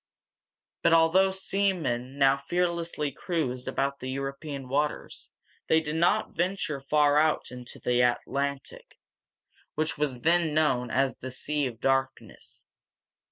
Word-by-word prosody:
But - - +4
although 165 +4 +5
seamen 180 -10 -1
now 135 -1 +5
fearlessly 170 0 -1
cruised 135 -5 -3
about 140 0 -1
the 130 - -5
European 135 +1 -5
waters, 145 +3 -2 0.4
they 160 - +4
did 155 -1 -4
not 175 +6 +1
venture 175 -6 -1
far 145 +1 +3
out 155 -4 +1
into 125 -1 -9
the 125 0 +1
Atlantic, 140 +3 -2 0.8
which 155 0 -1
was 135 -5 -1
then 165 -1 +2
known 130 -6 +2
as 130 +1 +1
the 130 - -6
"Sea 145 +2 -1
of 120 -3 -8
Darkness." 135 0 -2
145 Hz, 125 wpm, -27 LUFS, 130-165 Hz, 0.8 s, although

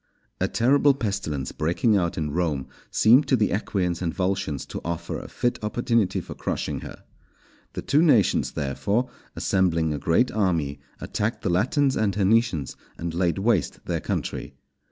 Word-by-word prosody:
_ - - +3
A - - +2
terrible 140 +3 +3
pestilence 100 - -3
breaking 90 +8 +1
out 85 -4 0
in 75 -2 -2
Rome 75 -5 -1 0.2
seemed 125 +7 +5
to 130 - +4
the 110 -4 +1
Equians 90 -4 -1
and 85 -2 0
Volscians 95 -7 -2
to - - -5
offer 85 0 -4
a - - -9
fit 120 -3 -2
opportunity 115 -1 +1
for - - -7
crushing - - -3
her. - - -10 0.7
The - - -5
two 150 - +3
nations, 125 - +3
therefore, 100 - -1 0.2
assembling 85 -5 +1
a 75 - -3
great 105 +10 +2
army, 85 -9 0 0.2
attacked 110 +3 -3
the 95 - +1
Latins 135 - +2
and 100 -3 0
Hernicians 105 - +1 0.2
and 85 -1 -4
laid 85 +1 +1
waste 100 -3 0
their - - -2
country. - - -4
95 Hz, 160 wpm, -25 LUFS, 85-115 Hz, 0.7 s, seemed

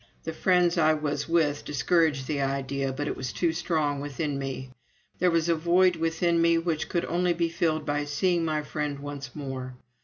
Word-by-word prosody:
The 160 - -4
friends 175 0 +3
I 155 -1 +4
was 150 0 -2
with 155 -4 +2
discouraged 150 0 +1
the 145 -1 -1
idea, 135 0 -1
but 145 +2 -3
it - - -2
was 130 -2 -4
too 170 -2 0
strong 155 -4 0
within 145 0 -3
me. 130 -1 -5 0.5
There 180 - +4
was 165 -1 +1
a 170 - +4
void 175 +3 +3
within 165 +1 +1
me 170 0 +4
which 165 -2 -1
could 175 - 0
only 175 +1 +1
be 170 0 0
filled 160 -2 0
by 145 0 -1
seeing 170 +4 +1
my 155 -2 -1
friend 150 -1 -3
once 140 -2 -7
more. 130 -3 -5
155 Hz, 190 wpm, -27 LUFS, 140-170 Hz, 0.5 s, I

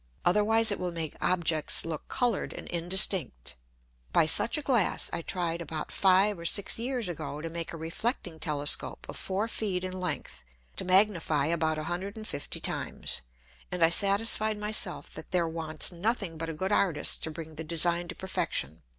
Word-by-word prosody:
Otherwise 215 +4 +4
it 205 - -2
will 180 -1 -3
make 165 -3 -4
Objects 165 -4 +2
look 160 -2 -5
colour'd 245 -5 0
and - - -8
indistinct. 170 - -1 0.6
By 165 - +4
such 225 - +4
a 300 - -4
Glass 240 -9 +2
I - - -2
tried 170 -1 -2
about 160 -1 -5
five 195 0 +4
or - - -8
six 200 +5 +4
Years 245 -2 -1
ago 150 -4 -4
to 165 +1 -6
make 165 0 -5
a 165 - -7
reflecting 165 - -3
Telescope 145 -3 +1
of - - -8
four 195 +3 -2
Feet 195 -5 -2
in 185 - -4
length 145 - -4 0.3
to - - -1
magnify 180 -6 +3
about 160 -1 0
150 180 +3 -5
times, - - -2 0.5
and 180 -2 0
I 165 - +6
satisfied 210 +3 +3
my 210 0 -3
self 215 - 0
that - - -8
there 175 -2 +1
wants 160 -1 +1
nothing 195 -1 -2
but 165 +1 -4
a - - -3
good 190 +6 -2
Artist 185 -7 +2
to - - -4
bring 160 0 -8
the 160 +1 -6
Design 170 +2 +1
to - - -7
perfection. 80 - 0
175 Hz, 175 wpm, -28 LUFS, 160-200 Hz, 0.6 s, I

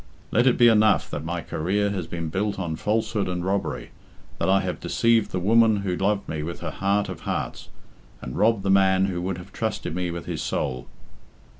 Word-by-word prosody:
Let 120 +4 +3
it 125 - +4
be 120 - +7
enough 110 -3 +4
that 75 - -4
my 85 +1 -3
career 100 +7 -1
has 90 -5 -3
been 85 -1 -4
built 100 +5 -1
on 85 -4 -3
falsehood 110 +1 -1
and 90 0 -3
robbery, 100 +1 -2 0.5
that - - +1
I 95 0 +4
have - - -3
deceived 115 -3 +2
the 95 - -2
woman 110 +2 +4
who 90 -2 0
loved 100 +2 0
me 80 -1 -3
with 85 +3 -6
her - - -3
heart 100 +1 0
of - - -6
hearts, - - -4 0.5
and 65 - -7
robbed 110 -2 +2
the 95 - +1
man 95 -1 +4
who 90 -2 -2
would 90 0 -2
have 90 - -11
trusted - - -3
me 90 0 -2
with 85 0 -5
his - - -4
soul." 65 -2 -2
95 Hz, 205 wpm, -24 LUFS, 85-105 Hz, 0.5 s, be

